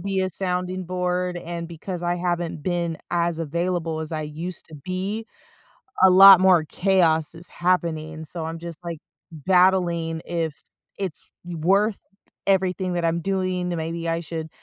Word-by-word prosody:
be 195 +1 -1
a 185 - 0
sounding 180 0 -2
board, 180 0 -1
and 170 -1 -5
because 175 +2 -6
I 175 0 +1
haven't 175 -3 -2
been 175 -2 -1
as 170 -1 0
available 165 0 -2
as 155 - -5
I 155 -1 -2
used 160 +4 -6
to - - -10
be, 185 +8 -4 0.8
a 190 - +9
lot 190 0 +10
more 180 -4 +5
chaos 165 -3 +2
is 170 +1 -8
happening, 160 -3 -1
so 165 +2 -4
I'm 165 0 -5
just, 170 -2 -7
like, 170 -2 -5 0.3
battling 170 -1 +2
if 165 -3 -2 0.5
it's 190 -6 -4 0.2
w 175 -1 -6
worth 200 +3 +3 0.5
everything 185 -1 +1
that 175 -1 -1
I'm 165 +1 0
doing, 185 -1 -1
then 175 - -2
maybe 165 +1 -3
I 165 - 0
should 160 -1 -6
175 Hz, 160 wpm, -24 LUFS, 165-185 Hz, 0.8 s, lot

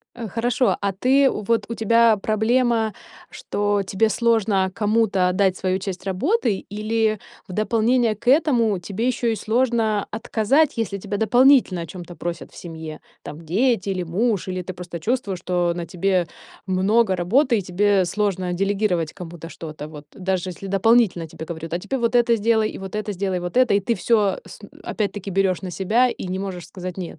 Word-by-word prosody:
Э, 235 -2 -6
хорошо, 240 +4 +1
а 200 -1 0
ты, 265 +7 +3
вот 225 +2 0
у 230 - -3
тебя 230 0 +4
проблема, 220 +1 +1 0.4
что 205 0 -1
тебе 195 +3 +1
сложно 215 -5 +2
кому-то 210 -3 +2
отдать 185 0 +2
свою 185 0 -1
часть 190 -1 -6
работы 210 - 0
или 215 +1 0 0.3
в - - -8
дополнение 225 +3 +2
к 225 +3 -6
этому 250 - +3
тебе 200 +7 -3
ещё 250 -1 0
и 225 - +2
сложно 225 -3 +1
отказать, 240 +7 +1
если 210 -3 -2
тебя 205 +1 -4
дополнительно 240 -3 +4
о 165 - -6
чём-то 175 +1 -9
просят 170 +1 -6
в - - -17
семье, 160 -2 -8 0.2
там 150 - -8
дети 200 +5 +1
или 185 -2 -1
муж, 195 +3 -1
или 185 0 -3
ты 185 0 -7
просто 175 -1 -7
чувствуешь, 210 -1 -1
что 175 -1 0
на 170 -1 -5
тебе 180 +1 0 0.4
много 190 +2 +2
работы 235 - +2
и 200 - -2
тебе 195 +2 +2
сложно 185 -1 -1
делегировать 195 -3 0
кому-то 170 -2 -9
что-то. 155 -3 -8
Вот 150 -1 -11
даже 185 -1 -2
если 185 +2 -9
дополнительно 195 -3 +3
тебе 160 0 -9
говорят: 165 0 -7
"А 170 - 0
теперь 265 +9 -3
вот 235 0 0
это 235 -1 +4
сделай, 220 0 +2
и - - -8
вот 190 0 -8
это 210 -1 -2
сделай, 190 -1 -2
и - - -6
вот 175 +5 -6
это", 255 -3 +4
и 200 - +3
ты 235 +4 0
всё 205 0 +1
с - - -12
и - - -9 0.2
опять-таки 205 -2 -3
берёшь 190 -1 +1
на 185 - -5
себя 210 +8 +2
и - - -6
не 185 +1 -3
можешь 190 -3 -5
сказать: 180 -1 -7
"Нет". 170 -3 -6
200 Hz, 190 wpm, -22 LUFS, 180-230 Hz, 0.4 s, тебя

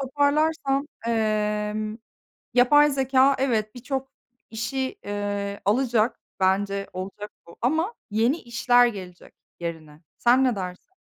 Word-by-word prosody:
toparlarsam, 285 +1 +1 0.2
emm, 215 -1 -1 0.6
yapay 290 +4 +6
zekâ 270 0 +3
evet 220 -5 0
birçok 265 +2 -4 0.4
işi, 260 +4 -3
eee, 205 0 -3
alacak 235 +1 +2 0.2
bence 195 +1 +1
olacak 195 +3 -6 0.2
bu 170 - -15
ama 320 - +1 0.2
yeni 230 +9 +2
işler 245 +1 +4
gelecek 185 -5 -8 0.3
yerine. 160 -2 -7 0.2
Sen 245 +2 +4
ne 250 -3 +2
dersin? 185 - -7
230 Hz, 110 wpm, -25 LUFS, 205-265 Hz, 0.6 s, yapay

